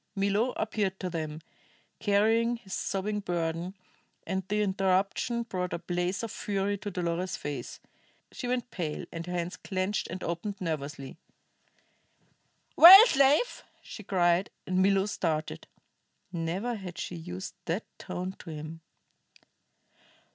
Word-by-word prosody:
Milo 200 +5 +1
appeared 205 -3 -1
to 185 -2 -3
them; 155 -2 -4 0.6
carrying 225 +3 +3
his 210 -5 -10
sobbing 210 +2 -2
burden, 175 -1 -2 0.5
and 190 0 -1
the 210 +1 +1
interruption 195 +4 +1
brought 185 -5 -3
a - - -1
blaze 175 +4 -2
of 230 - -4
fury 200 0 -1
to 205 - -5
Dolores's 180 0 -2
face. 145 -1 -6 0.5
She 250 - -5
went 250 0 -2
pale, 160 -5 -4
and 165 +1 -6
her - - -4
hands 175 +1 -3
clenched 190 +1 -2
and 185 +2 -6
opened 180 +4 -3
nervously. 145 -5 -4 1.6
"Well, 385 +6 +12
slave?" 285 - +3 0.2
she - - -9
cried, 180 -2 +2 0.2
and 185 0 +1
Milo 195 0 +3
started. 160 -6 -2 0.6
Never 180 +7 -2
had 180 -4 -8
she 180 - -4
used 180 +3 -6
that 180 +5 -2
tone 185 +1 -4
to - - -10
him. 155 +1 -7
190 Hz, 130 wpm, -29 LUFS, 170-210 Hz, 1.6 s, Well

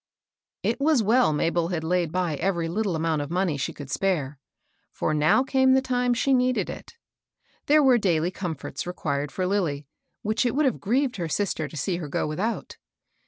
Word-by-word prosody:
T - - +1
was 285 -4 +3
well 235 0 +4
Mabel 165 +2 0
had 170 -3 -3
laid 175 -1 0
by 180 -3 -1
every 170 -1 -1
lit 210 +7 -1
tle 185 -4 0
amount 160 -1 0
of 145 - -5
money 180 -2 0
she 140 - -2
could 140 -3 -9
spare; 150 -8 -1 0.5
for 155 - -1
now 155 - +3
came 265 -1 +3
the - - +5
time 250 -2 0
she 270 +3 +2
needed 255 -1 +1
it. 465 - -11 0.7
There 300 +1 +5
were 255 -3 +5
daily 175 -3 +1
comforts 175 -4 -5
required 145 -5 -3
for 185 - -2
Lilly, 170 -7 -1 0.4
which 215 +3 +1
it 245 -1 0
would 300 +1 +2
have 260 - 0
grieved 250 +4 0
her 170 -3 -3
sister 165 -3 -1
to 155 - -10
see 175 +5 -1
her 165 -4 -5
go 140 - -1
without. 195 +10 -3
180 Hz, 195 wpm, -25 LUFS, 160-245 Hz, 0.7 s, the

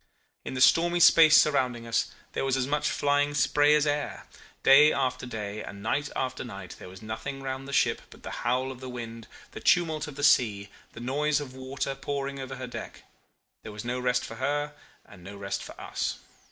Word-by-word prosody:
In - - -6
the 130 - -2
stormy 175 +6 +5
space 160 -2 +8
surrounding 125 -5 +1
us 115 - 0 0.2
there - - -1
was 135 -1 +1
as 130 - 0
much 150 +2 0
flying 145 0 +1
spray 145 +1 +4
as 150 0 +2
air. 145 0 -2 0.4
Day 150 +3 +7
after 130 -2 -1
day 105 -2 -5
and 100 0 -9
night 145 +6 -1
after 130 -1 -2
night 100 -7 -9
there - - -10
was 95 +4 -13
nothing 135 +6 -6
round 135 0 -5
the - - -7
ship - - +2
but - - -16
the - - -6
howl 125 +2 0
of 130 - -10
the 130 0 -7
wind, 115 -2 -7 0.2
the - - -8
tumult 160 -4 +2
of 145 - -9
the 145 - -6
sea, 105 -7 +3 0.2
the - - -10
noise 145 +5 0
of 140 -3 -7
water 130 +1 -4
pouring 140 0 -4
over 130 0 -6
her 130 0 -6
deck. 120 - -8 0.6
There - - -9
was 105 +2 -8
no 125 +1 -2
rest 125 0 0
for 115 - -9
her 145 +3 -1 0.3
and 90 -3 -15
no 100 +2 -9
rest 100 0 -4
for - - -10
us. - - -3
130 Hz, 205 wpm, -27 LUFS, 120-145 Hz, 0.6 s, space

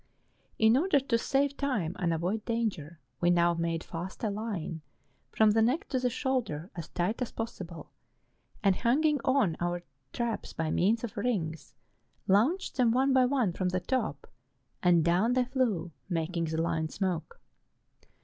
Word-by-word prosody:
In 220 +1 +5
order 330 0 +3
to 260 -3 +1
save 275 +3 +1
time 215 - -1
and 175 -3 +1
avoid 180 +7 -1
danger, 195 -10 -2 0.2
we 175 - +3
now 175 0 +4
made 165 0 -2
fast 175 +5 -7
a 215 - +1
line, 200 -7 -4 0.5
from 220 -1 +4
the 225 +1 +3
neck 275 - +1
to 260 - 0
the 250 0 +1
shoulder 235 - -2
as 170 -3 -6
tight 185 +8 -1
as 250 - -2
possible, 185 -7 -7 0.7
and 195 -3 +3
hanging 295 +5 +2
on 260 - +2
our 175 0 -2 0.3
traps 235 -2 -3
by 160 -1 -2
means 220 +6 +2
of 235 0 -5
rings, 180 -9 -2 0.5
launched 260 - +2
them 250 -3 +4
one 260 +3 +3
by 260 -1 +5
one 250 -8 +1
from 185 +1 -1
the 185 0 0
top, 215 - -2 0.6
and 175 -3 +4
down 185 +8 +3
they 255 0 +2
flew, 235 -10 0 0.2
making 165 0 -1
the 160 0 -2
line 165 -1 0
smoke. 180 -5 -3
205 Hz, 160 wpm, -30 LUFS, 170-250 Hz, 0.7 s, In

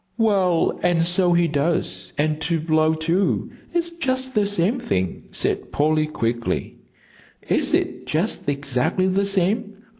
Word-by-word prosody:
"Well, 195 -7 +2
and 170 -2 +2
so 175 +1 +2
he 170 0 +3
does, 140 - -1
and 155 +1 0
to 165 +2 0
blow, 155 0 +2
too, 170 +5 0 0.2
it's 340 0 -1
just 260 -5 -2
the 210 -2 +2
same 205 +5 0
thing," 95 - -2
said - - -2
Polly, 155 +1 +2
quickly. 120 -5 -2 0.7
"Is - - +2
it - - -2
just 160 -1 -1
exactly 140 +6 0
the 195 +1 +1
same?" 200 +3 0
170 Hz, 140 wpm, -22 LUFS, 155-200 Hz, 0.7 s, he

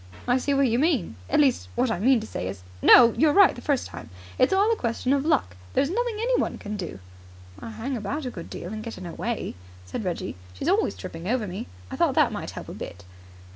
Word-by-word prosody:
I 245 +1 +3
see 280 +2 0
what 275 -1 +4
you 235 +1 +1
mean. 275 - +1
At - - +3
least, 270 -4 +2
what 245 -1 +1
I 200 - -1
mean 250 +4 +4
to - - -6
say 90 - -4
is 95 0 -7
" 90 - -20
"No. 235 -2 +8
You 315 - +4
were 295 - +3
right 395 -1 +7
the - - -10
first 280 -4 0
time. 80 - -9 0.3
It's - - +4
all 400 +3 +4
a - - +3
question 245 - -1
of 280 -1 +1
luck. 95 - +1 0.2
There's 280 +3 +2
nothing 475 +2 -1
anyone 485 +3 0
can 210 0 -6
do." 175 - -5 0.6
"I - - -7
hang 225 +5 -4
about 255 +7 -3
a 250 - -3
good 170 -6 -8
deal 180 +5 -6
and 215 0 -5
get 230 0 -7
in 185 - -8
her 170 - -6
way," 235 0 -3 0.3
said 90 - -5
Reggie. 175 - -3 0.2
"She's - - -4
always 100 - +2
tripping 165 - -7
over 240 0 0
me. 190 0 -6 0.2
I - - -5
thought - - +2
that - - +4
might - - -5
help - - -8
a - - -7
bit." 90 +2 -8
235 Hz, 250 wpm, -25 LUFS, 180-280 Hz, 0.6 s, No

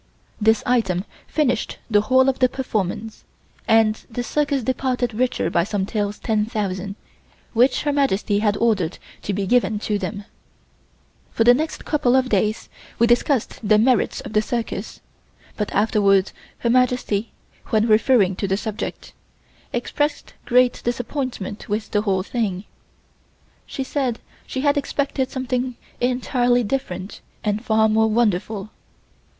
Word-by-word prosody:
This 220 +1 +3
item 200 -7 +1 0.2
finished 250 -7 0
the 210 -3 +3
whole 260 +4 +4
of 270 - +1
the 255 - +4
performance 220 -4 -3 0.4
and 220 -1 +3
the 245 +1 -3
circus 285 0 0
departed 255 -1 -1
richer 250 +3 0
by 170 - +3
some 200 0 -1
Taels 205 0 -2
10,000 210 -3 -2 0.6
which 250 +2 +3
Her 295 -1 0
Majesty 210 -7 +1
had 210 -1 +1
ordered 195 -7 +1 0.2
to - - -3
be 200 0 -1
given 220 0 +2
to 210 -2 -1
them. 200 0 -5 1.0
For 225 - +1
the 240 +2 +7
next 315 +5 -3
couple 260 -5 +2
of 260 -1 +2
days 215 +2 0 0.3
we 235 - +4
discussed 240 +1 +1
the 215 -1 +4
merits 240 +1 +2
of - - -9
the 215 - +4
circus 235 0 -4 0.5
but 210 - -3
afterwards, 200 -2 +3 0.2
Her 235 - -1
Majesty, 250 -4 +1 0.4
when 220 0 +2
referring 215 -3 +4
to 200 - -1
the 190 0 +1
subject, 215 +1 -5 0.6
expressed 290 +5 -2
great 250 0 +3
disappointment 240 -4 -4
with 210 +1 -2
the 205 - +2
whole 195 -3 0
thing. 200 -4 -2 1.0
She 270 - -4
said 260 -3 -1 0.3
she 260 - -3
had 285 0 +2
expected 280 -2 -1
something 255 -1 -2 0.2
entirely 245 0 +1
different 200 -6 -4 0.2
and 210 +1 -1
far 220 -1 +3
more 220 +1 +3
wonderful. 215 -2 0
225 Hz, 140 wpm, -22 LUFS, 205-255 Hz, 1.0 s, the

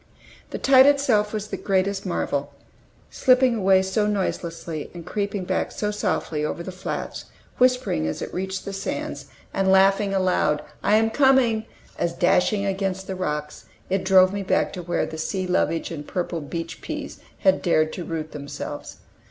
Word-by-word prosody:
The - - -4
tide 265 0 +6
itself 255 -8 +3
was 215 -1 -4
the - - -3
greatest 195 0 0
marvel, - - -2 0.6
slipping 255 -1 +4
away 190 -3 +4
so 210 +2 0
noiselessly, 170 -6 -3
and 170 -2 -8
creeping 200 -2 -2
back - - -1
so 210 0 -2
softly 180 -7 -1
over 160 +3 -3
the 185 - -6
flats, 185 +1 -5 0.3
whispering 250 - +2
as 80 - -3
it - - -6
reached 190 +1 -3
the 200 - -5
sands, 195 0 -4 0.3
and 190 -1 +2
laughing 195 +1 +4
aloud 180 -6 +1 0.2
"I 210 - +3
am 225 +1 +3
coming!" 250 -5 +3 0.3
as, 170 -1 0
dashing 180 +4 +2
against 190 -1 -2
the 190 - -4
rocks, 150 -4 -4 0.3
it 195 0 +1
drove 190 0 +5
me 200 - -2
back 190 - +1
to 180 - -5
where 175 0 -1
the 160 0 -7
sea 185 +3 -2
lovage 180 -2 0
and 150 -3 -6
purple 175 -3 -3
beach 165 +3 -6
peas - - -6 0.2
had 190 -2 +3
dared 155 -2 +2
to 180 - -5
root 160 -2 -4
themselves. 145 -1 -7
190 Hz, 170 wpm, -24 LUFS, 170-210 Hz, 0.6 s, tide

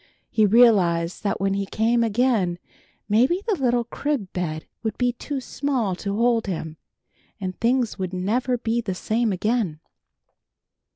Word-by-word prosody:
He 215 -2 +4
realized 190 -7 +4
that 205 - -1
when 195 0 +1
he 195 0 -2
came 230 +3 +2
again 220 -6 +1 0.5
maybe 255 - +2
the 450 - +1
little 245 -5 +1
crib 245 -4 -3
bed 160 -3 -3 0.2
would 220 -2 -3
be 245 0 +2
too 275 +3 -4
small 255 -7 -1
to 200 +1 -3
hold 230 0 +2
him, 160 -4 -4 0.6
and 185 -2 -4
things 235 -2 +1
would 185 -1 -2
never 235 +7 0
be 235 0 -1
the 195 -5 -3
same 220 +4 0
again. 200 -4 -1
220 Hz, 150 wpm, -23 LUFS, 190-245 Hz, 0.6 s, He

